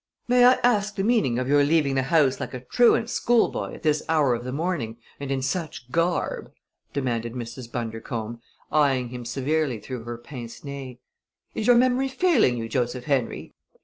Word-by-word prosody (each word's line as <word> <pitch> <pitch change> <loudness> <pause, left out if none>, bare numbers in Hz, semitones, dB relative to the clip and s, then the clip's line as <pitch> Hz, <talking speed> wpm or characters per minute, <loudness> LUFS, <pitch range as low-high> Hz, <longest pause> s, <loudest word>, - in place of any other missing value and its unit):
"May 245 0 +5
I 250 - +8
ask 210 -4 +2
the 195 - -1
meaning 200 - +2
of 125 0 -1
your 145 +1 +4
leaving 145 -2 +2
the 135 - +2
house 140 -1 +2
like - - -5
a - - -4
truant 225 - +3
schoolboy 240 0 +1
at - - -13
this 150 -1 +2
hour 150 -6 +3
of 120 0 -3
the 125 - -5
morning, 140 -7 -2 0.2
and 140 -1 -5
in 135 -1 -1
such 140 -4 -4
garb!" 170 +4 -1 0.4
demanded 120 -4 -2
Mrs. 120 0 -7
Bundercombe, 115 0 -4 0.3
eying 135 -5 +2
him 125 0 -7
severely 135 +1 -1
through 125 0 -6
her 120 0 -5
pince 120 -1 -9
nez. 140 -3 -7 0.6
"Is 220 - -2
your 245 - +7
memory 255 +2 +3
failing 265 - +2
you, 115 -1 -4
Joseph 125 0 -2
Henry? 135 -5 -2
135 Hz, 180 wpm, -25 LUFS, 120-170 Hz, 0.6 s, I